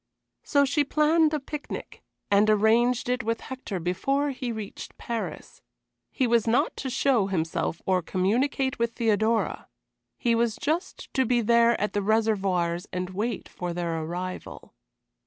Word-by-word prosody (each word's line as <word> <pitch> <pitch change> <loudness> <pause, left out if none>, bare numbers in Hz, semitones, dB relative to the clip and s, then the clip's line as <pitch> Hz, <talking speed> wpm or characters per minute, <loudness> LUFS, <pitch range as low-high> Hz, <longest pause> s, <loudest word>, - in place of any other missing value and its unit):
So 285 -2 +3
she 285 +2 +2
planned 305 +2 +3
a 305 - 0
picnic, 295 +2 -7 0.3
and 205 +1 +5
arranged 225 +4 +3
it 250 +1 0
with 230 0 -1
Hector 260 -7 -5
before 275 - 0
he 255 -2 -4
reached 215 -3 -7
Paris. 235 -1 -5 0.5
He 260 - 0
was 235 -1 +2
not 230 +2 +2
to 265 - -3
show 245 -5 +2
himself 165 -3 -2
or 185 -1 +2
communicate 240 - 0
with 235 0 0
Theodora; 225 -1 +1 0.5
he 240 -3 +1
was 230 -1 +1
just 320 +9 -3
to 265 - +3
be 240 -1 +2
there 235 +1 +4
at 210 - -1
the 205 - +1
Réservoirs 195 -5 +1
and 180 0 -3
wait 210 +3 -3
for 175 -1 -5
their 170 -2 -2
arrival. 180 +3 -6
230 Hz, 150 wpm, -26 LUFS, 195-260 Hz, 0.5 s, and